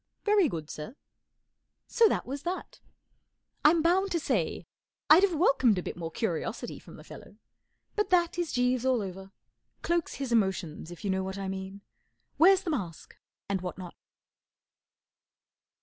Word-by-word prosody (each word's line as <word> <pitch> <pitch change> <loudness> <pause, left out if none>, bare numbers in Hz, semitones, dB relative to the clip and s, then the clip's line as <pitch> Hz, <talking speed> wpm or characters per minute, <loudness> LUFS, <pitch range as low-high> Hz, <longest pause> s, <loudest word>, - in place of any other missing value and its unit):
'* - - -53
4 420 - +3
Very 395 -8 +4
good, 160 -6 -5
sir." 155 - -8 0.9
So 460 -1 +4
that - - -1
was 275 +3 -5
that. 355 +3 -5 0.8
I'm 320 +1 +5
bound 375 +4 +3
to 340 - +1
say 230 - -1 0.5
I'd 320 +4 +9
have 390 -4 +2
welcomed 260 - +3
a 180 - -2
bit - - -5
more 165 -2 -5
curiosity 175 -2 -3
from - - -14
the - - -13
"fellow, - - -12 0.6
but 420 -2 0
that 350 -1 +2
is 345 -2 -1
Jeeves 250 0 +1
all 255 -4 +2
over. 190 0 -8 0.5
Cloaks 340 -1 0
his 270 -3 -4
emotions, 190 -8 0
if 175 - -11
you 195 - +1
know 190 0 0
what 190 +1 -5
I 195 -1 -4
mean. 190 +1 -6 0.6
Wears 380 +3 +6
the 340 - -2
mask 180 - -5 0.3
and 195 -2 -1
what 180 -1 -5
not. 180 -2 -8
245 Hz, 165 wpm, -29 LUFS, -, 0.9 s, I'd